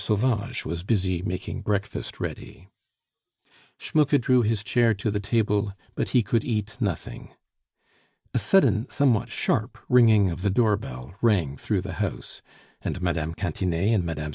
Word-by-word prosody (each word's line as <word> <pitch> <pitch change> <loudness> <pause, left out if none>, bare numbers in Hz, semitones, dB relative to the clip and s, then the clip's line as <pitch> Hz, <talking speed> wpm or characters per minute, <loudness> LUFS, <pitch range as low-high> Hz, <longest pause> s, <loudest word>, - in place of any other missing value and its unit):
Sauvage 110 0 0
was 85 +1 -3
busy 95 -3 0
making 90 -1 -4
breakfast 100 0 -3
ready. 95 - -7 1.1
Schmucke 150 -2 +2
drew 125 +1 +3
his 110 -2 0
chair 120 -2 +2
to 105 +2 -2
the 105 - -1
table, 105 -1 0 0.2
but - - -2
he 125 -3 +3
could 110 +2 +1
eat 110 -2 -2
nothing. 100 -8 -4 1.0
A - - +2
sudden, 125 - +3
somewhat 120 -5 +2
sharp 115 0 -1
ringing 110 -6 +5
of 85 - -6
the 100 - +1
door 105 +1 +3
bell 65 -7 -8
rang 95 - +2
through - - -1
the - - -6
house, - - -4 0.4
and - - -3
Mme. 85 -3 -1
Cantinet 90 +5 -1
and 100 -5 +2
Mme. 75 -3 -4
105 Hz, 150 wpm, -25 LUFS, 90-115 Hz, 1.1 s, ringing